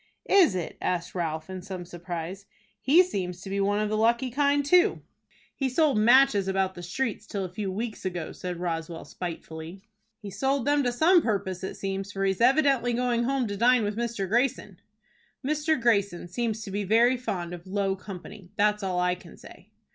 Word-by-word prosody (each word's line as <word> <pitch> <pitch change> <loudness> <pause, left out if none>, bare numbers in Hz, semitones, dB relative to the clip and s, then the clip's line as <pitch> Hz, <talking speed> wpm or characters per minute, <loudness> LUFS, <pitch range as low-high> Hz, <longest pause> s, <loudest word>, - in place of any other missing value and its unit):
"Is 365 - +6
it?" 175 -3 -5
asked 180 -1 -2
Ralph, 160 -3 -3
in 185 -1 -6
some 185 -1 -7
surprise. 175 +2 -6 0.3
"He 320 +7 +6
seems 185 - -4
to 195 - -8
be 200 - -1
one 205 +1 +1
of 215 0 0
the 215 - 0
lucky 235 +3 +2
kind 285 +2 +2
too." 360 +7 +3 0.5
"He 270 -2 -1
sold 280 -3 +2
matches 235 -3 +5
about 190 -1 0
the 175 - -9
streets 210 +4 -3
till 195 -2 -3
a 180 - -9
few 195 -1 -3
weeks 220 +3 -5
ago," 175 -4 -4
said 180 -1 -6
Roswell, 165 -1 -4
spitefully. 165 +1 -7 0.4
"He 205 -4 -8
sold 265 +6 0
them 290 0 +3
to 245 -3 +1
some 335 +8 +5
purpose, 195 - -2
it 190 - -4
seems, 195 0 -4
for 195 -1 -2
he's 190 +1 0
evidently 265 -2 +3
going 240 -1 +1
home 270 -1 0
to 200 - -3
dine 240 +2 +4
with 205 0 -2
Mr. 230 -4 -2
Greyson." 225 -3 0 0.7
"Mr. 305 +1 +1
Greyson 200 -7 +1
seems 220 +3 -2
to 200 - -7
be 205 +1 -2
very 230 +5 +4
fond 180 -8 -4
of 175 +1 -9
low 195 0 0
company. 190 0 -10
That's 210 +1 +2
all 185 -2 -1
I 180 0 +2
can 180 -1 -12
say." 185 +4 -15
205 Hz, 195 wpm, -27 LUFS, 185-245 Hz, 0.7 s, Is